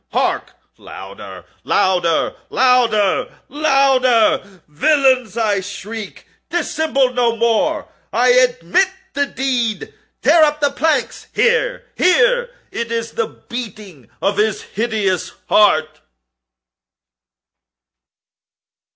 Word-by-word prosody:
—hark! - - -1 0.3
louder! - - -11 0.2
louder! 175 -3 +1
louder! 245 -2 +2 0.2
louder! 260 - +2
"Villains!" 255 - +2
I 210 -3 +1
shrieked, 205 +2 -8 0.2
"dissemble 310 -6 0
no 240 -2 +1
more! 235 +7 0 0.2
I 245 +2 +2
admit 250 - +3 0.2
the 285 0 0
deed!—tear 260 +5 -1
up 300 0 +2
the 285 -1 +1
planks!—here, 470 - 0
here!—It 485 - 0
is 230 0 -3
the 455 - -2
beating 205 - -9
of 200 +1 0
his 215 0 0
hideous 210 -4 -2 0.2
heart!" 155 -7 +3
245 Hz, 80 wpm, -18 LUFS, 210-285 Hz, 0.3 s, admit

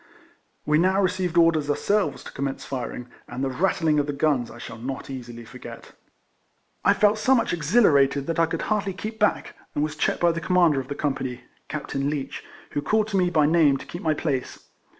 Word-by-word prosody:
"We 150 +1 +3
now 190 +3 +3
received 185 -2 0
orders 165 -3 +4
ourselves 200 +7 0
to - - -9
commence 135 0 -4
firin<?, 125 -2 -5 0.2
and 125 +2 -5
the 135 - 0
rattling 160 0 +1
of 145 - 0
the 145 - -2
guns 140 -4 +1
I 115 - -11
shall 115 - -9
not 135 +3 -5
easily 120 -3 -8
forget. - - -11 0.9
I - - +4
felt 210 +1 +3
so 265 +4 +4
much 230 - +1
exhilarated 145 - +3
that 165 +1 -2
I 165 - +4
could - - -3
hardly 200 -2 -1
keep 215 +4 -6
back, 210 - +1 0.2
and 145 - +1
was 155 - -2
checked - - 0
by 175 -1 +5
the 165 0 -4
Commander 170 -5 +3
of 130 - -6
the 145 - -5
company 135 -4 -3 0.2
(Capt. - - -5
Leech), 140 0 -3 0.3
who 145 - -1
called 215 +7 +1
to 200 - 0
me 180 -1 +3
by 155 -4 +3
name 150 -3 +4
to - - -10
keep 175 - -8
my 155 -2 +1
place. 140 -5 -3
155 Hz, 205 wpm, -24 LUFS, 135-180 Hz, 0.9 s, by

